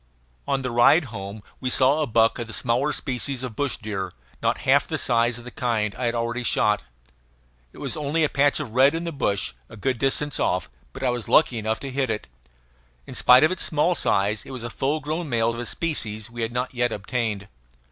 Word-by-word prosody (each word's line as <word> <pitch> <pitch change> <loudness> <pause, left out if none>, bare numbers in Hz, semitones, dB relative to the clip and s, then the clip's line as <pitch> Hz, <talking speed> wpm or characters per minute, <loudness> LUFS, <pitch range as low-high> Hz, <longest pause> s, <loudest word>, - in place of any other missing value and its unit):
On 135 -1 0
the 125 - -2
ride 120 +8 +5
home 100 0 -7 0.2
we 130 - -2
saw 135 +4 +4
a 150 - 0
buck 115 +1 +3
of 120 - -4
the 115 - -8
small 125 +6 +1
species 130 -1 -2
of 125 -4 -5
bush 140 -2 -1
deer, 100 -4 -5 0.3
not - - +1
half - - +4
the - - -2
size 120 0 +2
of 120 - -10
the 125 - -9
kind 110 -5 -1
I 125 - -4
had 115 - -1
already 120 +1 -2
shot. 105 - +1 0.9
It - - -17
was - - -4
only 155 +1 0
a - - +4
patch 140 +1 +2
of 140 -7 -5
red 135 +6 +4
in 165 - -2
the 170 - -3
bush, 100 - -1 0.2
a - - -12
good 130 +2 -1
distance 140 +2 0
off, 90 -1 0 0.2
but - - -8
I 125 - +2
was 120 -2 -4
lucky 125 -7 +4
enough 110 +1 -1
to 135 - -5
hit 130 -1 -1
it. 110 -1 -3 0.8
In - - -9
spite 125 +2 +6
of 155 - +4
its 185 - -2
small 155 +3 +2
size 105 - +1
it - - -13
was 130 -3 -6
a 120 - -5
full 145 +6 -1
grown 155 +2 -3
male, 115 -2 +2
of 115 - -6
a 120 - -4
species 110 -9 -2
we 120 0 -6
had 115 0 -1
not 125 +2 -2
yet 120 -1 +1
obtained. 105 -1 -3
120 Hz, 230 wpm, -24 LUFS, 110-140 Hz, 0.9 s, spite